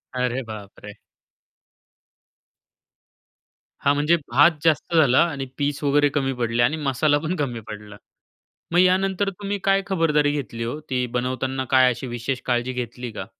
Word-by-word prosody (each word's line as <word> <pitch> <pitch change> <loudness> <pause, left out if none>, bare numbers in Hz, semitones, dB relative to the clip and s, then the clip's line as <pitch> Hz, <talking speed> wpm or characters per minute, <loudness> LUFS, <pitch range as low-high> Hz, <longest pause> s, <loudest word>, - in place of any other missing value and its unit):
अरे, 125 +1 -1
बापरे! 105 -2 -10 2.9
हा 140 - +3
म्हणजे 150 +4 +2 0.2
भात 145 +7 +6
जास्त 160 +1 +1
झाला 140 -5 +5
आणि 140 -4 -5
पीस 145 0 -2
वगैरे 145 0 +3
कमी 135 -2 -1
पडले 120 -1 0
आणि 150 +6 +1
मसाला 145 0 +1
पण 160 +4 -3
कमी 135 -8 -3
पडला 105 0 -9 0.8
मग 175 - +3
यानंतर 190 +2 +2
तुम्ही 200 +1 -4
काय 195 0 +3
खबरदारी 150 -6 +2
घेतली 125 -5 -4
हो, 120 +6 -4
ती 130 -4 -2
बनवताना 130 +2 -2
काय 130 -1 +6
अशी 120 +2 -6
विशेष 120 +2 -4
काळजी 120 0 0
घेतली 125 0 -5
का? 100 -3 -6
135 Hz, 145 wpm, -23 LUFS, 120-155 Hz, 2.9 s, भात